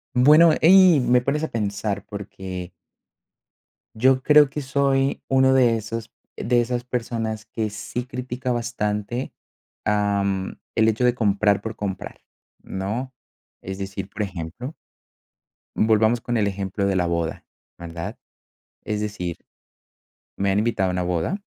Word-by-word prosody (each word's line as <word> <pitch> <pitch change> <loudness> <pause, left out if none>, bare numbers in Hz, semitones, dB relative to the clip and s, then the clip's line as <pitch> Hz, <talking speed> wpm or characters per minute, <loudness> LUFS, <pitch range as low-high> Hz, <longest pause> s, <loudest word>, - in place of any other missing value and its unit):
Bueno, 150 +6 +7
ahí 185 -2 +7
me 125 -1 +3
pones 145 +5 -1
a - - 0
pensar, 100 -3 -3
porque 95 -3 -7 1.2
yo 130 +3 +3
creo 150 -1 +6
que 150 +2 -4
soy 135 0 +1
uno 130 0 +4
de 120 -3 +4
esos, 110 +1 -6 0.2
de 120 0 +2
esas 120 0 -2
personas 115 -3 -3
que 110 -3 -3
sí 115 +4 -5
critica 125 0 -4
bastante, 120 0 -2 0.5
am, 100 -2 0 0.2
el 110 0 +4
hecho 110 +3 +2
de 125 - +4
comprar 100 -2 +2
por 110 +1 -5
comprar, 95 -3 -5 0.4
¿no? 110 +8 -4 0.5
Es 95 0 -6
decir, 95 0 -5
por 105 +1 -3
ejemplo 95 - -6 1.0
volvamos 110 +2 +3
con 120 -1 -1
el 105 - +2
ejemplo 100 0 -2
de 100 -1 +1
la 90 -2 +1
boda, 85 -1 -2 0.3
¿verdad? 85 -1 -6 0.7
Es 105 -1 -2
decir 95 -5 -4 1.0
me 100 0 +1
han 95 - +1
invitado 105 -4 +1
a - - 0
una 90 0 -1
boda, 90 - -1
110 Hz, 135 wpm, -23 LUFS, 100-125 Hz, 1.2 s, Bueno